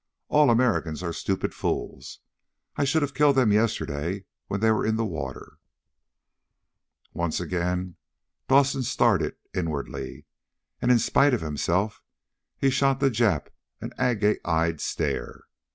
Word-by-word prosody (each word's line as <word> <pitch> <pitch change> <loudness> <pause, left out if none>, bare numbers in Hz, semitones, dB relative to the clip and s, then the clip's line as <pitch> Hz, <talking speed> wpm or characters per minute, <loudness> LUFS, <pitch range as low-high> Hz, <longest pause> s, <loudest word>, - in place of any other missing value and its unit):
All 150 -1 +5
Americans 115 -9 +1
are 85 -1 -3
stupid 95 +2 -2
fools. - - -4 0.5
I 145 - +1
should 150 +2 +2
have 140 -1 -3
killed 145 0 +4
them 125 -5 +4
yesterday 95 -4 -1 0.2
when 100 0 -2
they 110 +1 +3
were 110 - +1
in 110 0 +1
the 115 0 0
water." 85 -7 -6 1.5
Once 85 -2 -1
again 90 0 -2 0.5
Dawson 135 0 +4
started 125 - +1 0.2
inwardly, 70 -6 -4 0.6
and 120 - +1
in 125 - +6
spite 135 +4 +3
of - - -4
himself 85 +7 -1 0.6
he 135 - +2
shot 135 0 +2
the 135 -1 +3
Jap 110 - +1 0.3
an - - -7
agate 105 -4 +1
eyed 80 -1 0
stare. - - -3
105 Hz, 135 wpm, -26 LUFS, 85-130 Hz, 1.5 s, in